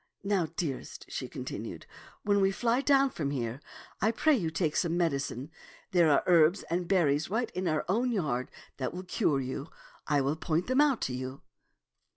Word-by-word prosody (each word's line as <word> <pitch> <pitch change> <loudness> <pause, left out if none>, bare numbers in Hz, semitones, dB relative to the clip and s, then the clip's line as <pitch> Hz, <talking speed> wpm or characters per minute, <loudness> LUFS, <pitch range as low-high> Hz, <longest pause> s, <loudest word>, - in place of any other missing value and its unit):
Now, 195 -4 +1
dearest," 145 -7 -4
she - - -4
continued, - - -6 0.2
" - - -23
when 200 -1 +3
we 195 - +4
fly 235 +5 +1
down 275 -1 +4
from 145 -4 -2
here, 125 -1 -3 0.4
I 215 - +4
pray 300 +7 +3
you 175 -10 -1
take 160 -2 -1
some 170 -1 +1
medicine. 140 -4 -1 0.4
There 175 -3 +5
are 145 - +4
herbs 175 +1 +4
and 175 0 0
berries 160 -5 +2
right 225 +3 -1
in 185 0 -2
our 155 -2 0
own 235 +7 +1
yard 140 - -1 0.3
that 130 +4 -3
will 185 - -5
cure 155 -5 +1
you. 130 +3 -4 0.4
I 145 -2 +3
will 140 +3 0
point 160 +2 0
them 260 +3 +3
out 285 -5 +3
to 130 - -1
you." 130 +1 -6
170 Hz, 190 wpm, -30 LUFS, 140-205 Hz, 0.4 s, There